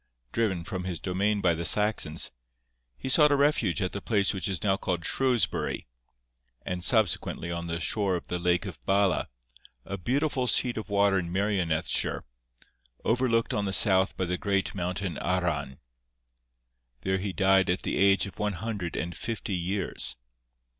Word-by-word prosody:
Driven 100 -7 0
from 90 +1 -5
his 90 -3 -3
domain 100 +3 0
by 90 -3 +3
the 85 +1 -3
Saxons, 90 -3 +2 0.7
he - - -6
sought 150 +2 +6
a - - +5
refuge 140 - +2
at 90 - -1
the 100 - -5
place 100 -2 +1
which 95 - -3
is 95 -4 -2
now 95 -2 +3
called 90 -3 -3
Shrewsbury, 125 -9 0 0.8
and 90 -1 -3
subsequently 95 -5 +1
on 85 0 -4
the 85 0 -3
shore 100 +2 +1
of 85 - -5
the 90 - -3
lake 90 -1 +1
of - - -8
Bala, 100 -1 +2 0.6
a 100 - -5
beautiful 130 - 0
sheet 125 0 +3
of 110 -1 -6
water 100 -1 +3
in 85 -1 -5
Merionethshire, 95 -5 0 0.8
overlooked 115 -1 +1
on 105 - 0
the 95 - -1
south 95 -2 +3
by 95 - 0
the 90 +1 -2
great 100 -1 0
mountain 90 -1 -3
Arran. 85 -7 -1 1.2
There 95 +6 0
he 100 +1 -3
died 95 -1 +3
at 90 - 0
the - - -1
age 95 -1 +4
of 100 - -10
one 105 -1 0
hundred 100 -2 -4
and 85 +2 -3
fifty 110 -3 -4
years. 90 -4 -2
95 Hz, 165 wpm, -28 LUFS, 90-105 Hz, 1.2 s, sought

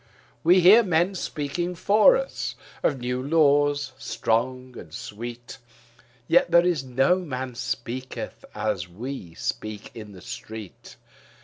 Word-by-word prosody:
We 180 +3 +6
hear 200 +7 +8
men 180 -2 +1
speaking 175 +1 -3
for 215 - +5
us - - -4 0.3
of 140 - +1
new 125 +1 -2
laws 145 -1 +3
strong 125 +3 -1
and - - -10
sweet, 115 +2 -8 0.7
Yet 170 0 +4
is 170 -6 +1
there 130 -2 -13
no 180 +1 +4
man 130 -7 -5
speaketh 120 +2 -5
as 100 -5 -2
we 105 -3 -7
speak 110 +3 -5
in 105 -3 -9
the 90 - -12
street. 110 0 -9
130 Hz, 125 wpm, -25 LUFS, 115-170 Hz, 0.7 s, hear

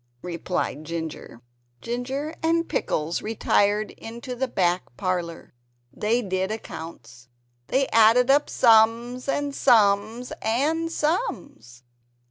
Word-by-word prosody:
replied 170 -3 -3
Ginger. 160 -7 -6 0.4
Ginger 265 +6 -4
and 330 +1 +1
Pickles 155 +3 -2
retired 210 -1 +1
into 235 +2 -8
the 260 +2 -1
back 180 -5 +1 0.2
parlor. 175 -3 -3 0.4
They 230 +3 0
did 190 -1 -2
accounts. 145 - -8 0.4
They 270 0 +1
added 230 +4 +5
up 290 +1 +3
sums 235 +2 +3
and 285 0 -1
sums, 220 -1 +2
and 310 +9 0
sums. 295 - -3
225 Hz, 100 wpm, -24 LUFS, 180-260 Hz, 0.4 s, added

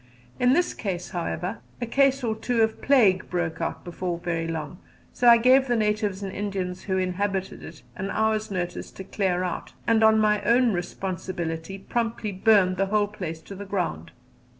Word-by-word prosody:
In 250 +1 +4
this, 350 +4 +2 0.4
however, 180 +3 -3 0.2
a 240 - -2
case 275 +2 +2
or 225 -2 0
two 230 +1 +1
of 220 0 -1
plague 215 -10 +4
broke 175 -2 -2
out - - -3
before 175 0 -3
very 165 -1 -2
long, 160 +1 -5 0.3
so 245 - +1
I 235 - +9
gave 260 +3 +5
the 240 - +2
natives 210 -2 0
and 190 -1 -5
Indians 190 -3 -4
who 190 -2 0
inhabited 190 +1 -2
it 155 -4 -11
an 195 +1 -4
hour's 220 +1 0
notice 180 -3 -4
to 190 - -8
clear 185 -2 -1
out, 180 -2 -4
and 225 -1 +3
on 220 0 +6
my 210 -1 +3
own 235 +2 +3
responsibility 175 -1 -4
promptly 225 +1 -2
burned 190 -2 +3
the 195 +1 +1
whole 205 0 +1
place 170 -6 -6
to 200 - -10
the 200 +1 -7
ground. 180 - -3
195 Hz, 175 wpm, -25 LUFS, 180-220 Hz, 0.4 s, I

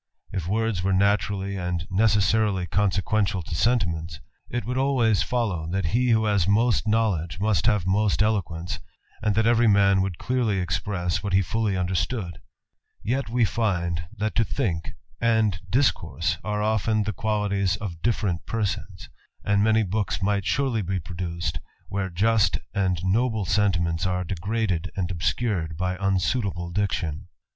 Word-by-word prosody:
If 95 -4 -3
words 110 -1 0
were 95 +1 +1
naturally 100 0 +1
and 90 -2 -3
necessaril 105 -2 +2
consequential 100 0 +1
to 80 - -7
sentiments, 85 -6 0 0.3
it 120 0 -3
would 125 +2 -1
always 125 -6 +2
follow, 100 -10 -1
that 95 -1 -1
h 80 - -1 0.2
who 110 -1 +3
has 100 -4 +2
most 110 +2 +2
knowledge 95 -7 0
must 105 -3 +1
have 105 -6 +2
most 105 +2 +2
eloquence, 90 -5 -1 0.4
an 105 -1 +1
that 110 +2 +2
every 120 0 +4
man 100 -2 +4
would 95 -3 -2
clearly 120 -4 0
express 90 0 -1
what 100 -2 -3
he 95 +1 +4
fully 105 +1 -1
unde 90 0 -1
stood: 90 -4 -2 0.6
yet 130 +2 -1
we 120 0 +2
find, 85 -7 -1
that 110 +2 -1
to 115 - +3
think, 85 -5 -2 0.2
and 110 -5 +2
discourse, 130 +7 +1
are 105 -1 -2
oft^ 110 0 +1
the 105 - -2
qualities 100 -1 0
of 95 -6 -6
different 105 -7 -1
persons: 100 -4 -3 0.4
and 100 0 +3
many 110 0 +3
books 100 -2 -2
mig; 100 0 +1
surely 130 -4 +1
be 95 0 -2
produced, 85 +1 -4 0.3
where 100 -1 -2
just 100 +1 +2 0.2
and 95 -3 0
noble 110 +1 +1
sentiments 90 -3 +1
s^ 90 0 -1
degraded 95 -1 -1
and 95 -3 -2
obscured 85 -2 -1
by 90 +1 -1
unsuitable 95 -2 0
diction. 90 -5 -2
100 Hz, 150 wpm, -25 LUFS, 90-110 Hz, 0.6 s, every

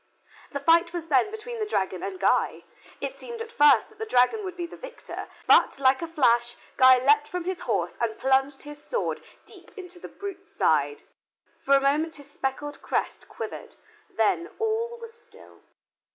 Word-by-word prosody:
The 280 - -3
fight 335 +4 +3
was 335 -2 -5
then 280 +8 +3
between 445 +2 -7
the 430 - -1
dragon - - -1
and 380 -2 -5
Guy. - - +1 0.4
It - - -5
seemed 470 -1 -7
at 460 0 -7
first 295 -9 +5
that 435 -1 -22
the 445 - -3
dragon 250 - +3
would 370 -2 -6
be 345 - -3
the 340 - -10
victor, - - -9 0.2
but, - - +5
like 265 +1 +3
a 335 - -3
flash, 240 -6 +2 0.2
Guy 260 0 +7
leaped 290 +3 +3
from 360 +2 -4
his 370 0 -3
horse - - -1
and 225 -2 -1
plunged 270 +1 +1
his 295 0 -10
sword 480 +10 -3 0.2
deep - - -15
into 360 -1 -10
the - - -9
brute's 395 -1 -8
side. 435 0 +1 0.6
For 275 - +3
a - - +5
moment 295 +4 +1
his 285 -1 -13
speckled 290 +2 -4
crest - - -3
quivered, - - -8 0.3
then 225 - 0
all 450 +2 -1
was 460 -1 -10
still. 470 +2 -18
335 Hz, 180 wpm, -26 LUFS, 275-435 Hz, 0.6 s, Guy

